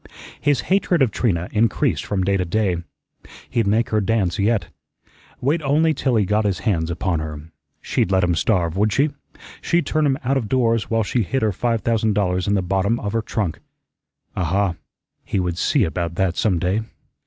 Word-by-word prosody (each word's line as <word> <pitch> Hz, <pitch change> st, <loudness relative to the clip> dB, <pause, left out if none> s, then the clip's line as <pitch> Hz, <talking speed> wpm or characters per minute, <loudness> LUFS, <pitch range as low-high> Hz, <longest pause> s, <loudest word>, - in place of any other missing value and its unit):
His 145 Hz, -3 st, +2 dB
hatred 185 Hz, -5 st, +2 dB
of 120 Hz, -, +1 dB
Trina 90 Hz, -6 st, 0 dB
increased 110 Hz, +1 st, +1 dB
from 95 Hz, -2 st, -1 dB
day 100 Hz, +1 st, +1 dB
to 95 Hz, -, +1 dB
day. 90 Hz, 0 st, 0 dB, 0.7 s
He'd 115 Hz, -4 st, +1 dB
make 110 Hz, +4 st, +2 dB
her 110 Hz, -1 st, +1 dB
dance 105 Hz, -2 st, 0 dB
yet. 100 Hz, -3 st, +1 dB, 0.7 s
Wait 145 Hz, +6 st, +1 dB
only 155 Hz, +3 st, +2 dB
till 130 Hz, -4 st, 0 dB
he 105 Hz, -3 st, +3 dB
got 105 Hz, +3 st, +1 dB
his 100 Hz, -3 st, 0 dB
hands 85 Hz, -8 st, 0 dB
upon 85 Hz, 0 st, -1 dB
her. 75 Hz, 0 st, -7 dB, 0.3 s
She'd -, -, 0 dB
let 95 Hz, -1 st, +2 dB
him 90 Hz, 0 st, +2 dB
starve, 85 Hz, -1 st, +1 dB
would 105 Hz, +2 st, +2 dB
she? 140 Hz, +7 st, +2 dB, 0.5 s
She'd 170 Hz, 0 st, +1 dB
turn 155 Hz, -1 st, +1 dB
him 135 Hz, -1 st, +1 dB
out 135 Hz, +2 st, +1 dB
of 115 Hz, -6 st, -3 dB
doors 115 Hz, -3 st, +1 dB
while 115 Hz, -1 st, +1 dB
she 115 Hz, +4 st, 0 dB
hid 130 Hz, +6 st, -1 dB
her 110 Hz, -, +2 dB
five 115 Hz, +3 st, -1 dB
thousand 110 Hz, -2 st, +1 dB
dollars 90 Hz, -2 st, 0 dB
in 100 Hz, -, +2 dB
the 95 Hz, -, 0 dB
bottom 95 Hz, +5 st, 0 dB
of 100 Hz, 0 st, -4 dB
her 115 Hz, -, +1 dB
trunk. 105 Hz, -6 st, -3 dB, 0.8 s
Aha, 95 Hz, +1 st, +1 dB, 0.5 s
he 100 Hz, -, -2 dB
would 90 Hz, -1 st, -2 dB
see 140 Hz, -6 st, +2 dB
about 85 Hz, -1 st, -2 dB
that 90 Hz, -1 st, 0 dB
some 100 Hz, -5 st, +1 dB
day. 90 Hz, +6 st, 0 dB
105 Hz, 195 wpm, -21 LUFS, 90-115 Hz, 0.8 s, he